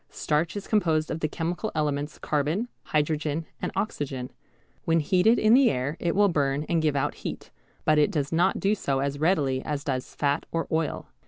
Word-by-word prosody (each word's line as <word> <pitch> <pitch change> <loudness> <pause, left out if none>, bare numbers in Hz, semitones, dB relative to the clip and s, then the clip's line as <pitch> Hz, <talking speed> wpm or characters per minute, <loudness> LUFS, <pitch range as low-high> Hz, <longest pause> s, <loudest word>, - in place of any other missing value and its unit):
Starch 160 +3 -1
is 200 - -5
composed 160 -7 +1
of 160 - -3
the 155 - 0
chemical 175 +7 -3
elements 150 -1 -1
carbon, 155 - -1 0.2
hydrogen, 155 +1 0 0.2
and - - -2
oxygen. 135 -10 -3 0.5
When 165 0 +2
heated 190 +8 +3
in 215 +1 +4
the 260 0 +6
air 130 +4 -1
it 170 -1 0
will 205 +1 +5
burn 145 -4 0
and 170 -1 +1
give 155 -2 +1
out 140 +1 0
heat, - - -7 0.3
but 155 0 +4
it 150 - +4
does 145 -2 -2
not 175 +4 +2
do 200 +2 +2
so 140 -10 -1
as 140 +1 -2
readily 145 -6 +2
as 145 -1 -3
does 130 -4 -3
fat 145 +1 0
or 165 0 -1
oil. 160 -1 -1
155 Hz, 190 wpm, -26 LUFS, 145-175 Hz, 0.5 s, the